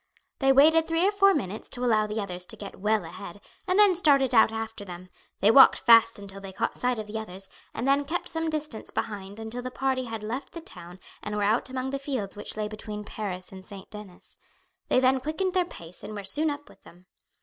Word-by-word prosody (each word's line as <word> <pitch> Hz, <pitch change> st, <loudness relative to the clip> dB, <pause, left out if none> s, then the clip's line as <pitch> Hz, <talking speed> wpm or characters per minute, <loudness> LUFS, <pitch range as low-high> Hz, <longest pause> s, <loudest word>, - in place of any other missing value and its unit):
They 270 Hz, -1 st, +4 dB
waited 315 Hz, +4 st, +5 dB
three 330 Hz, +2 st, +2 dB
or -, -, +3 dB
four 395 Hz, -1 st, +5 dB
minutes 215 Hz, -6 st, -4 dB
to 250 Hz, 0 st, -3 dB
allow 215 Hz, -3 st, +3 dB
the 210 Hz, +1 st, -3 dB
others 180 Hz, -3 st, -4 dB
to -, -, -7 dB
get 200 Hz, -, -10 dB
well 210 Hz, +2 st, +1 dB
ahead -, -, -9 dB, 0.3 s
and 370 Hz, +1 st, +2 dB
then 415 Hz, -2 st, +7 dB
started 280 Hz, -7 st, +4 dB
out 220 Hz, -1 st, +6 dB
after 225 Hz, -1 st, -5 dB
them; 180 Hz, -1 st, -10 dB, 0.3 s
they 205 Hz, -, +6 dB
walked 270 Hz, +2 st, +8 dB
fast 230 Hz, -1 st, +5 dB
until 195 Hz, -1 st, -10 dB
they 195 Hz, -1 st, -8 dB
caught 185 Hz, -, -2 dB
sight 250 Hz, -1 st, 0 dB
of 215 Hz, -, -4 dB
the 215 Hz, +1 st, -5 dB
others, 195 Hz, -2 st, -6 dB, 0.2 s
and 235 Hz, +4 st, -4 dB
then 280 Hz, +1 st, +3 dB
kept 350 Hz, +5 st, -2 dB
some 325 Hz, -1 st, +1 dB
distance 305 Hz, -7 st, -3 dB
behind 205 Hz, -1 st, -5 dB
until 225 Hz, +2 st, -4 dB
the 255 Hz, -, -5 dB
party 260 Hz, 0 st, -1 dB
had 225 Hz, -2 st, -6 dB
left 240 Hz, +6 st, -5 dB
the 335 Hz, -, -6 dB
town 180 Hz, -, -11 dB, 0.2 s
and 210 Hz, 0 st, -5 dB
were 205 Hz, -, 0 dB
out 220 Hz, +5 st, +1 dB
among 260 Hz, 0 st, -3 dB
the 275 Hz, -, -3 dB
fields 260 Hz, -9 st, -4 dB
which 205 Hz, -, -7 dB
lay 215 Hz, -1 st, -1 dB
between 210 Hz, 0 st, -7 dB
Paris 185 Hz, -4 st, -5 dB
and 190 Hz, -1 st, -11 dB
St. 195 Hz, 0 st, -12 dB
Denis. 210 Hz, -4 st, -12 dB, 0.5 s
They -, -, +3 dB
then 260 Hz, +1 st, +3 dB
quickened 315 Hz, +7 st, -2 dB
their 365 Hz, -2 st, +2 dB
pace 170 Hz, -, -11 dB
and 215 Hz, +1 st, -7 dB
were 205 Hz, -, -6 dB
soon 305 Hz, +11 st, +1 dB
up 290 Hz, 0 st, -6 dB
with -, -, -19 dB
them. 180 Hz, +2 st, -18 dB
225 Hz, 230 wpm, -27 LUFS, 205-275 Hz, 0.5 s, walked